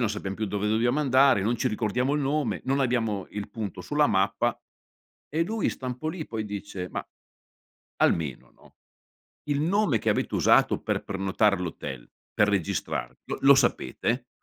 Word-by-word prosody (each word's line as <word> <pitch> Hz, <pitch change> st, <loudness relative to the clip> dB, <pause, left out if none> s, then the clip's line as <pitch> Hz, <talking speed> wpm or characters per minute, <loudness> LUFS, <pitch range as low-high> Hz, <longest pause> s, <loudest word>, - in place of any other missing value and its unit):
non 115 Hz, -4 st, +1 dB
sappiam 100 Hz, -2 st, -4 dB
più 110 Hz, +1 st, -3 dB
dove 105 Hz, +1 st, -1 dB
dobbiamo 120 Hz, +6 st, +2 dB
andare, 135 Hz, -5 st, +5 dB
non 115 Hz, +3 st, +1 dB
ci 130 Hz, -, 0 dB
ricordiamo 120 Hz, +5 st, 0 dB
il 150 Hz, -, +1 dB
nome, 135 Hz, -8 st, 0 dB
non 135 Hz, +1 st, +1 dB
abbiamo 115 Hz, -6 st, 0 dB
il 105 Hz, 0 st, -5 dB
punto 100 Hz, -5 st, -5 dB
sulla 150 Hz, +7 st, +2 dB
mappa." 95 Hz, 0 st, +1 dB, 0.7 s
E 165 Hz, +2 st, +2 dB
lui 220 Hz, +4 st, -1 dB
sta 130 Hz, -, -7 dB
un 125 Hz, -1 st, -3 dB
po' 155 Hz, -, -3 dB
lì, 160 Hz, -1 st, -5 dB
poi 110 Hz, -1 st, -4 dB
dice: 100 Hz, -3 st, -6 dB
“Ma -, -, -5 dB, 0.9 s
almeno, 75 Hz, -7 st, 0 dB
no, -, -, -22 dB, 0.8 s
il 145 Hz, 0 st, +1 dB
nome 175 Hz, -, +2 dB
che -, -, -2 dB
avete -, -, -1 dB
usato -, -, +4 dB
per -, -, -2 dB
prenotare 100 Hz, +1 st, +1 dB
l'hotel, 80 Hz, -8 st, -6 dB, 0.2 s
per 105 Hz, -, +3 dB
registrarvi, 100 Hz, -5 st, -2 dB
lo -, -, -4 dB
lo 140 Hz, 0 st, +8 dB
sapete?” 125 Hz, -1 st, 0 dB
115 Hz, 170 wpm, -27 LUFS, 100-135 Hz, 0.9 s, lo